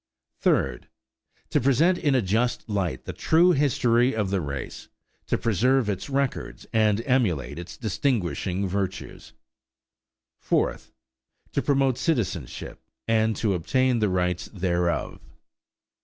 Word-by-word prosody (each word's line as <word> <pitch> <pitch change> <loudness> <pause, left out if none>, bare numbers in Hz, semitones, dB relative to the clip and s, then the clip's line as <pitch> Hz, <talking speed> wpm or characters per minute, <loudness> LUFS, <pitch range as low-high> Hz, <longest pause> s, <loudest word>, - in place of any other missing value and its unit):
Third. 65 -3 +1 0.6
To - - +2
present 155 +8 +3
in 145 -5 +2
a 125 - +2
just 115 +8 0
light 95 - -2
the - - -5
true 170 +3 +4
history 125 -5 +2
of 105 -3 -1
the 100 -2 +1
race, 70 -3 -6 0.4
to - - +1
preserve 120 +3 +2
its 95 +5 -3
records 140 -1 -2
and 110 0 +2
emulate 90 - 0
its 85 -1 -9
distinguishing 100 - -1
virtues. 95 0 -4 1.1
Fourth. - - -1 0.6
To - - 0
promote 135 -3 +1
citizenship 100 - -2 0.3
and 110 -1 +2
to 105 -4 0
obtain 130 - +1
the 105 -2 +2
rights 90 -1 -1
thereof. 90 -3 -1
110 Hz, 120 wpm, -25 LUFS, 90-130 Hz, 1.1 s, true